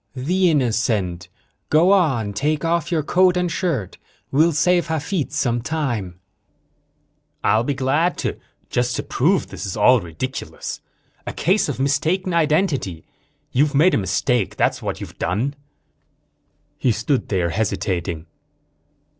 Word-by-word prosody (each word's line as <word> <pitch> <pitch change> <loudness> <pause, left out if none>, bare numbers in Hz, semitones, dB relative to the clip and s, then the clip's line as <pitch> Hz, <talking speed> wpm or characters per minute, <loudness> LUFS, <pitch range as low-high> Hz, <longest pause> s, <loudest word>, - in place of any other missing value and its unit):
"The 180 +8 +2
innocent! 110 - 0 0.4
Go 165 +5 +5
on, 135 - +2
take 150 +8 -1
off 170 0 0
your 160 -3 +1
coat 180 +3 +3
and 180 -1 0
shirt. 155 - -2 0.3
We'll 155 +5 +4
save 175 +3 +2
Hafitz 160 0 -2
some 120 -2 +1
time." 120 - -3 1.2
"I'll 110 +1 +3
be 140 +3 -1
glad 155 +7 +1
to, - - -2 0.3
just 120 0 0
to - - -2
prove 170 +8 +1
this - - -7
is 100 0 -4
all 120 +3 +5
ridiculous. 90 - -6 0.5
A - - -3
case 190 -1 +1
of 135 - -4
mistaken 160 +7 0
identity. 155 - +1 0.5
You've 145 +3 +2
made 170 +6 +5
a - - +4
mistake, 95 +4 0
that's - - +1
what - - -4
you've - - -9
done." 110 +12 -1 1.3
He 125 - +2
stood 115 +5 -1
there, 90 -4 0
hesitating. 90 -5 -2
135 Hz, 135 wpm, -21 LUFS, 110-165 Hz, 1.3 s, Go